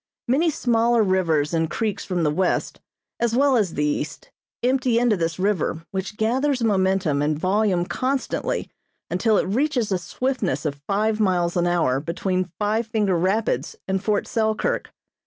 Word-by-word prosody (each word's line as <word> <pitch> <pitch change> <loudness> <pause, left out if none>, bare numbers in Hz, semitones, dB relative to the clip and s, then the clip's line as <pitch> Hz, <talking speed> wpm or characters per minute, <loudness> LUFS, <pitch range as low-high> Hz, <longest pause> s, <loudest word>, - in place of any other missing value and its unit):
Many 295 +8 +3
smaller 235 -4 +2
rivers 170 -6 +1
and 165 -1 +1
creeks 220 -3 -2
from 180 -3 -1
the 150 - +2
west 180 +4 -1 0.4
as 235 -1 +1
well 275 +1 +4
as 205 -8 +1
the 150 - +1
east 150 0 -3 0.3
empty 255 -1 +2
into 240 -2 +3
this 165 -3 -2
river 185 -4 -1
which 190 +2 -4
gathers 255 +3 +1
momentum 190 -8 +2
and 150 0 0
volume 185 0 +1
constantly 265 +6 -2 0.4
until 210 +4 +2
it - - +2
reaches 245 +1 0
a 185 - +1
swiftness 250 +1 -2
of 140 -1 -3
five 215 +2 +1
miles 180 -4 +1
an 175 -1 +2
hour 160 -7 +2
between 180 +3 -2
Five 215 +2 0
Finger 210 -4 +1
Rapids 185 - 0
and 190 0 -1
Fort 210 -1 +1
Selkirk. 220 -2 -1
200 Hz, 155 wpm, -23 LUFS, 175-230 Hz, 0.4 s, well